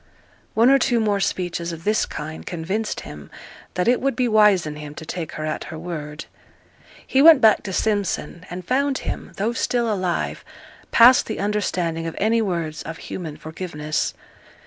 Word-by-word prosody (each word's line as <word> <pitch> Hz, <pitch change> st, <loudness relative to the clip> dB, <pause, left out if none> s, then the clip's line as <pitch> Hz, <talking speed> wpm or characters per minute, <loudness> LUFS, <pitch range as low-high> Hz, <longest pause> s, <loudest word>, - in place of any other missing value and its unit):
One 235 Hz, +4 st, +5 dB
or 275 Hz, -, +6 dB
two 240 Hz, -2 st, +2 dB
more 210 Hz, -2 st, +1 dB
speeches 175 Hz, -3 st, -2 dB
of 165 Hz, 0 st, -8 dB
this 215 Hz, +3 st, +1 dB
kind 155 Hz, +1 st, -6 dB
convinced 190 Hz, +6 st, -3 dB
him 75 Hz, -1 st, -10 dB, 0.5 s
that 180 Hz, -, 0 dB
it 245 Hz, +1 st, +3 dB
would 275 Hz, 0 st, 0 dB
be 250 Hz, -1 st, +1 dB
wise 210 Hz, -5 st, +5 dB
in 150 Hz, -1 st, -5 dB
him 150 Hz, 0 st, -8 dB
to 160 Hz, -, -8 dB
take 165 Hz, -1 st, -5 dB
her 155 Hz, -, -4 dB
at 155 Hz, -, -3 dB
her 160 Hz, -, -7 dB
word. 155 Hz, -3 st, -6 dB, 0.8 s
He 265 Hz, -, +2 dB
went 315 Hz, -1 st, +9 dB
back 220 Hz, -3 st, +5 dB
to 195 Hz, -, -6 dB
Simpson, 195 Hz, -5 st, -1 dB
and 180 Hz, 0 st, -7 dB
found 275 Hz, +1 st, +1 dB
him, -, -, -5 dB
though 215 Hz, +4 st, 0 dB
still 235 Hz, -2 st, 0 dB
alive, 185 Hz, -3 st, -2 dB, 0.5 s
past 245 Hz, +2 st, +7 dB
the 220 Hz, -, -4 dB
understanding 180 Hz, -5 st, -1 dB
of 165 Hz, -, -5 dB
any 225 Hz, +2 st, +2 dB
words 170 Hz, -6 st, -2 dB
of 165 Hz, -, -7 dB
human 160 Hz, -5 st, -7 dB
forgiveness. 155 Hz, -1 st, -3 dB
185 Hz, 175 wpm, -22 LUFS, 160-220 Hz, 0.8 s, went